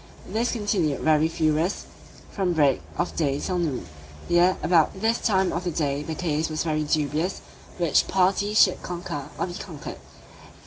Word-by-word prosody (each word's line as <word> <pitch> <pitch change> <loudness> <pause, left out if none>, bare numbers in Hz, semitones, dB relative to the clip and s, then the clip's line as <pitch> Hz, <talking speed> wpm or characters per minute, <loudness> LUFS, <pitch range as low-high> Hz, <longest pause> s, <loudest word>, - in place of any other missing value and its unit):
This 225 +5 -1
continued 200 - 0
very 155 0 +3
furious 160 +2 0 0.5
from 190 -3 0
break 145 -5 +3 0.2
of - - -2
day 140 -4 0
till 180 +3 -2
noon; 145 - -2 0.4
yea, 175 +2 +4
about 175 +2 +3
this 225 +3 +1
time 190 -4 +1
of 175 - -2
the 180 - -1
day 145 -3 -1
the 160 +1 -5
case 160 -1 -1
was 155 0 -2
very 155 -2 0
dubious 155 +4 -1 0.4
which 170 -5 +2
party 195 +2 +1
should 185 -3 +5
conquer, 170 -5 -5
or - - 0
be 175 - -7
conquered. 170 -4 -8
170 Hz, 165 wpm, -25 LUFS, 155-185 Hz, 0.5 s, should